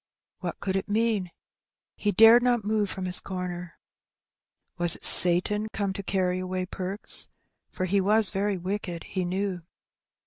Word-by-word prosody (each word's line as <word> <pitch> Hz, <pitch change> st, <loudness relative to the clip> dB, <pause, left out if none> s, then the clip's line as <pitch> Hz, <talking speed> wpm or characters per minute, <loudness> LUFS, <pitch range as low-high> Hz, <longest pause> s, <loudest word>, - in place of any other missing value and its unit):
What -, -, -6 dB
could 190 Hz, -1 st, -4 dB
it 195 Hz, -, -4 dB
mean? 215 Hz, -3 st, -1 dB, 0.7 s
He 205 Hz, -, -2 dB
dared 225 Hz, +4 st, +6 dB
not 240 Hz, -3 st, 0 dB
move 210 Hz, -1 st, -1 dB
from 190 Hz, 0 st, -6 dB
his 180 Hz, 0 st, +4 dB
comer. 180 Hz, -2 st, -7 dB, 1.0 s
Was 175 Hz, -1 st, +1 dB
it -, -, -8 dB
Satan 185 Hz, +5 st, +6 dB
come 200 Hz, -2 st, -3 dB
to 200 Hz, -, -6 dB
carry 185 Hz, -2 st, -2 dB
away 185 Hz, 0 st, -4 dB
Perks? 190 Hz, +2 st, +2 dB, 0.4 s
for 185 Hz, -, -5 dB
he 195 Hz, +2 st, 0 dB
was 210 Hz, +2 st, +1 dB
very 200 Hz, 0 st, -2 dB
wicked, 180 Hz, -2 st, -5 dB
he 185 Hz, -1 st, -4 dB
knew. 185 Hz, 0 st, -4 dB
190 Hz, 150 wpm, -25 LUFS, 180-210 Hz, 1.0 s, dared